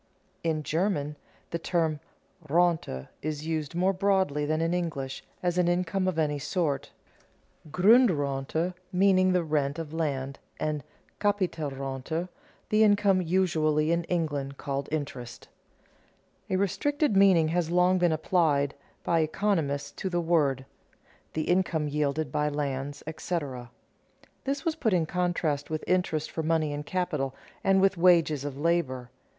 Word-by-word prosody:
In 160 -2 0
German 155 -3 -1 0.4
the 170 - -2
term 165 -3 0 0.5
Rente 160 - +1
is 155 0 -4
used 160 -1 -3
more 185 +2 +2
broadly 190 -7 +1
than 155 +1 0
in 165 +1 +1
English, 150 -7 -3 0.2
as 175 0 +1
an 175 - +3
income 180 +2 0
of 185 -3 -1
any 150 -2 +1
sort, 150 -2 -1 0.8
Grundrente 165 - +3 0.2
meaning 185 0 +4
the 180 -1 +2
rent 145 -2 0
of 160 -2 -6
land, 140 -4 -2 0.2
and 150 -2 -2 0.4
Capitalrente 160 -5 -2 0.4
the 215 +1 +4
income 205 -3 +4
usually 160 -3 +1
in 170 0 +1
England 145 -6 -2
called 140 0 -3
interest. 135 -6 -5 1.0
A 190 - +1
restricted 205 - +1
meaning 190 -5 +5
has 170 0 0
long 180 +1 +3
been 175 -1 +3
applied 155 -3 +2 0.3
by 170 - +2
economists 160 -4 0
to 190 - -2
the 175 -1 0
word: 150 -6 +1 0.7
the 155 - -1
income 175 -4 +1
yielded 150 -1 -1
by 150 +1 +1
lands, 140 -1 -3
etc. 145 -6 -4 0.8
This 275 0 -2
was 330 - +2
put 230 -10 0
in 170 -3 +2
contrast 170 -4 -1
with 155 0 -3
interest 170 -4 0
for 160 - -2
money 160 -2 +1
and 145 0 -5
capital, 155 -8 -1 0.3
and 195 0 +4
with 195 -1 +3
wages 165 -5 +4
of 145 -2 -5
labor. 140 -6 0
160 Hz, 135 wpm, -28 LUFS, 145-180 Hz, 1.0 s, meaning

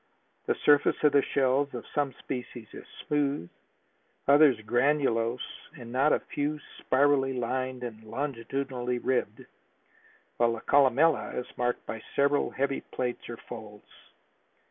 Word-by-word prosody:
The - - +2
surface 145 -1 +5
of 150 - +6
the 140 - +5
shells 135 0 +1
of 120 - -6
some 145 -2 0
species 125 -2 -7
is - - -10 0.2
smooth, 145 - -1 0.8
others 140 -1 +6
granulose 120 0 0
and 120 -2 -10
not 135 +4 +3
a - - +2
few 150 +1 -1 0.2
spirally 135 0 +2
lined 130 +1 -2
and 110 -2 -7
longitudinally 125 0 -3
ribbed, 130 +1 -1 0.9
while 120 -1 +3
the 115 - -6
columella 145 +3 +3
is 125 - -2
marked 120 0 -1
by 110 - -6
several 140 +1 +2
heavy 135 0 -1
plaits 125 -2 -4
or 120 - -6
folds. 105 -3 -9
130 Hz, 130 wpm, -28 LUFS, 120-140 Hz, 0.9 s, of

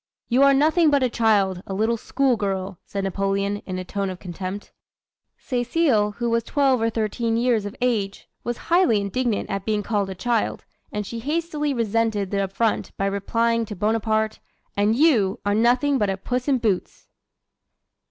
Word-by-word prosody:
"'You 250 +2 +3
are 275 0 +7
nothing 310 +3 +4
but 285 -2 +3
a 250 - +1
child, 200 -6 +2
a 195 - -4
little 220 +3 +1
school 265 +3 +1
girl,' 195 -3 -3
said 200 -1 -3
Napoleon, 195 +1 -1
in 185 -1 -3
a 185 - -4
tone 200 +1 -2
of 185 - -6
contempt. 185 +2 -6 0.7
"Cecile, 245 -4 +1
who 240 +3 -3
was 230 0 +1
twelve 270 -4 +2
or 225 - +2
thirteen 225 +1 -1
years 230 -4 +1
of 205 - -8
age, 215 -6 -1 0.2
was 240 0 -3 0.2
highly 345 - +4
indignant 215 +3 -1
at 195 -1 -2
being 210 -1 -1
called 205 -3 -1
a 190 - -5
child, 230 +4 -1 0.3
and 210 0 -3
she 230 +3 -6
hastily 300 +2 -1
resented 225 -4 0
the 200 -1 +1
affront 205 +3 -1
by 195 - 0
replying 230 +4 0
to 210 - -7
Bonaparte, 220 +2 0 0.4
'And 205 +2 +2
you 240 -8 +3
are 205 - +2
nothing 245 +5 +3
but 205 - +1
a 190 - -1
Puss 250 +6 -3
in 275 -2 +3
Boots!'" 215 -6 -2
220 Hz, 175 wpm, -23 LUFS, 200-245 Hz, 0.7 s, are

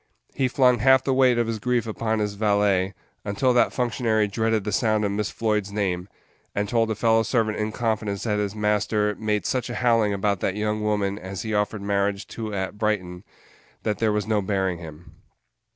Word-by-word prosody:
He 130 - +1
flung 125 -1 +3
half 130 +2 +5
the 135 - +1
weight 130 -2 +4
of 120 - +2
his 115 -1 -3
grief 120 0 0
upon 110 0 -2
his 105 -1 -1
valet, 100 -2 +1 0.3
until 105 +5 +1
that 120 - +3
functionary 115 -3 0
dreaded 110 +1 0
the 105 - -3
sound 110 +1 +1
of 100 - 0
Miss 105 +1 -1
Floyd's 105 -3 -1
name, 95 -3 -2 0.5
and 105 0 0
told 115 +1 +1
a 110 - -1
fellow 115 +1 +3
servant 110 -2 0
in 105 0 -1
confidence 110 -3 -2
that 105 -2 0
his 105 0 -2
master 105 0 +1
"made 105 -1 -1
such 125 -1 -1
a 120 - -4
howling 115 -4 +2
about 100 -1 0
that 95 - -1
young 105 0 -1
woman 105 -1 0
as 95 +1 -6
he 110 -1 -3
offered 105 0 -1
marriage 100 0 0
to 110 -2 -5
at 100 +1 -4
Brighton 95 -4 -1 0.6
that 105 -3 -1
there 110 -2 +2
was 105 -1 -1
no 110 -1 +1
bearing 95 -3 -1
him." 80 -1 -12
105 Hz, 200 wpm, -24 LUFS, 100-115 Hz, 0.6 s, half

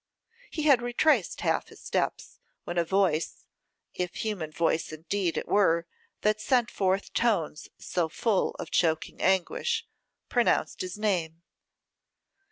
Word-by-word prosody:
He 310 - -3
had 280 -5 +5
retraced 245 +6 +2
half - - +1
his - - -15
steps, - - -2 0.2
when 175 0 -2
a - - +3
voice, 170 -3 0 0.5
if 180 -1 -3
human 200 -8 -3
voice 165 0 0
indeed 170 +3 -2
it - - -3
were 170 -5 +3 0.4
that 215 0 +2
sent 240 0 +2
forth 190 0 0
tones 200 -10 0
so 170 -3 -1
full 205 +3 0
of - - -7
choking 160 -2 +1
anguish, 450 - +1 0.4
pronounced 240 -2 +1
his 185 +2 -5
name. 170 -6 -1
190 Hz, 130 wpm, -28 LUFS, 170-220 Hz, 0.5 s, had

